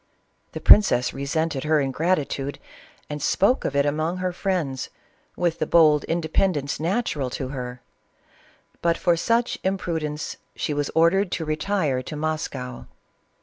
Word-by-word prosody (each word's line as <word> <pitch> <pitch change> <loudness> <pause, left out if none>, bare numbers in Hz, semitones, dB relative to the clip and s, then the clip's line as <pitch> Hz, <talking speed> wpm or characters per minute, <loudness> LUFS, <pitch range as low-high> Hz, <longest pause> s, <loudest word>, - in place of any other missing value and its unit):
The - - -4
princess 190 -12 +6
resented 140 +1 -2
her 155 0 +3
ingratitude 140 -1 -1 0.5
and 150 0 -5
spoke 245 +7 +2
of 140 - -2
it 140 0 +3
among 155 +4 -1
her 185 -1 -2
friends, 175 -9 -2 0.5
with 170 -2 0
the - - -1
bold 155 -3 +5
independence 160 -3 0
natural 160 - -1
to 130 +1 -4
her; 125 -2 -6 1.0
but 170 -1 +2
for 175 -2 +2
such 230 +8 0
imprudence 160 -6 -2 0.2
she 150 - -2
was 145 -1 -1
ordered 175 +4 +3
to 160 - -2
retire 155 -3 0
to 150 - -7
Mos 155 +1 -1
cow. 125 -2 -8
155 Hz, 140 wpm, -24 LUFS, 140-175 Hz, 1.0 s, princess